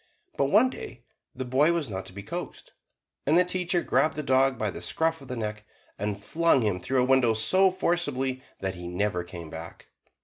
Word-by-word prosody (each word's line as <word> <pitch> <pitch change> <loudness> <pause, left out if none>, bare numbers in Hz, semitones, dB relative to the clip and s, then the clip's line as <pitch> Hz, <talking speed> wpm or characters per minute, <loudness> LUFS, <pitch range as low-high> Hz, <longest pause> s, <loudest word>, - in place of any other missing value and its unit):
But 140 - +2
one 215 - +4
day 120 - -9 0.3
the 130 - -4
boy 140 +7 +3
was 165 -4 -1
not 95 -3 -5
to - - -9
be 100 +1 -8
coaxed, - - -7 0.6
and 155 +4 +5
the 180 - +5
teacher 180 -1 0
grabbed 155 - +2
the 150 - -3
dog 130 -1 +3
by 105 -2 -1
the - - -8
scruff 160 -1 0
of 135 - -12
the 125 - -4
neck, 105 -2 -4 0.4
and 105 -1 -2
flung 160 +4 +2
him 100 -4 0
through 130 +7 +1
a - - +2
window 130 -3 +4
so 185 - +4
forcibly 145 -8 -1 0.2
that 95 -1 -2
he 90 -1 -8
never 90 0 -1
came 85 -3 -9
back. 80 +1 -9
130 Hz, 205 wpm, -27 LUFS, 105-160 Hz, 0.6 s, and